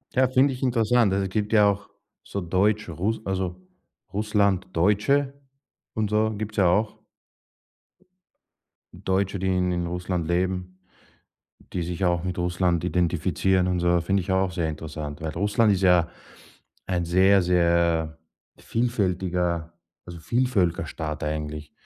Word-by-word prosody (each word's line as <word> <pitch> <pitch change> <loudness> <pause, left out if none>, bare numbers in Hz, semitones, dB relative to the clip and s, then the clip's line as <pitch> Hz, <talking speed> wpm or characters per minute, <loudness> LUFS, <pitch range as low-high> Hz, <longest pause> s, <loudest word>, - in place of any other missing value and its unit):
Ja, 130 0 +4
finde 130 +1 +3
ich 125 - -9
interessant. 120 -3 +2
Es 95 0 0
gibt 105 +3 -2
ja 105 -1 +6
auch 100 0 -4 0.3
so 100 - -5
Deutsch 100 +4 +1
Rus 100 +7 -3
also, 95 -2 -2 0.6
Russlanddeutsche 105 +6 +1 0.6
und 110 -2 0
so, 110 +1 +2
gibt's 105 0 -6
ja 95 -3 +4
auch. 105 +4 0 1.9
Deutsche, 95 +1 -1
die 95 - -1
in 90 -2 0
Russland 90 -1 -3
leben, 90 +1 -2 0.9
die 90 - -2
sich 85 +2 -3
auch 85 -1 +1
mit 90 -1 -3
Russland 90 -1 0
identifizieren 90 +1 +1
und 90 -1 0
so, 85 0 +2
finde 95 +3 0
ich 90 - -6
auch 95 -1 +1
sehr 85 -2 -1
interessant, 75 -1 -6
weil 80 0 -3
Russland 105 +5 +2
ist 95 -1 -1
ja 90 -3 +4 0.8
ein 90 -2 -1
sehr, 95 +3 +4
sehr 85 -2 +1 0.4
vielfältiger 90 -7 -1 0.3
also, 85 -1 -9
Vielvölkerstaat 85 -8 -1
eigentlich. 75 0 -4
90 Hz, 130 wpm, -25 LUFS, 85-105 Hz, 1.9 s, ja